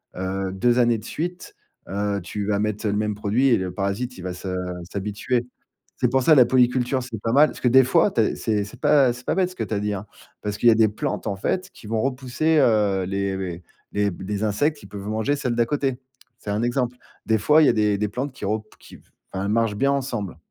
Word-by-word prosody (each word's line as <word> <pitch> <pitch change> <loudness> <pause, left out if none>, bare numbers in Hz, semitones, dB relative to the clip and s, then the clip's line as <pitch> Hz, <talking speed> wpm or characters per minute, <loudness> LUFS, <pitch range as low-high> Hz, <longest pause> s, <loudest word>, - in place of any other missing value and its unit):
heu, 95 +1 -3
2 120 +5 +2
années 120 -2 +3
de - - -14
suite, 175 +8 -5 0.3
heu, 100 +1 -1
tu 100 +4 -4
vas 100 0 0
mettre 105 +1 -2
le 100 - +1
même 105 0 -1
produit 105 +6 +1
et 125 - +5
le 95 -1 -3
parasite 100 +5 -3
il - - -7
va 90 0 -5
se 95 +1 -6 0.4
s'habituer. 105 +5 -2 0.5
C'est 125 - +1
pour 130 +1 +2
ça 155 - +6
la 130 -5 +7
polyculture 125 +1 +2
c'est 115 -4 -7
pas 115 +1 -1
mal, 150 +3 +6
parce - - -10
que - - +2
des 130 +2 +7
fois 165 +10 +3
tu 120 - +1
as 110 - +1
c'est 105 -2 -1
c'est 100 - -11
pas 135 -4 +4
c'est 125 +1 -12
pas - - +1
bête 185 -1 +1
ce - - -14
que - - -3
tu 110 - -3
as - - 0
dit 105 0 -1
hein, 100 +1 -6 0.3
parce 105 -1 -3
qu'il 120 - +5
y - - +8
a - - +4
des 110 0 +5
plantes 105 - -3
en 100 - -1
fait 185 - -2
qui 150 - -16
vont 110 +1 -1
repousser, 135 +4 0
heu, 105 -8 +3
les 100 0 -2
les 90 -2 -5 0.3
les 100 0 +1
b 90 - -8
les 105 0 -2
insectes, 145 +9 0
ils - - -12
peuvent 100 -1 -8
manger 110 +7 0
celles 125 -4 -2
d'à 120 0 +2
côté. 135 -3 -1 0.4
C'est 105 - -8
un 105 +3 0
exemple. 125 0 -1 0.3
Des 110 - +3
fois, 150 +10 +4
il - - +6
y - - +6
a - - +4
des 105 -2 +1
des 105 - +1
plantes 130 +6 -4
qui - - -12
repou 110 +1 -2
qui, - - -14 0.3
enfin 95 +1 -3
elles 100 - -1
marchent 115 -1 +1
bien 135 +6 +2
ensemble. 125 - -3
110 Hz, 260 wpm, -23 LUFS, 100-130 Hz, 0.5 s, y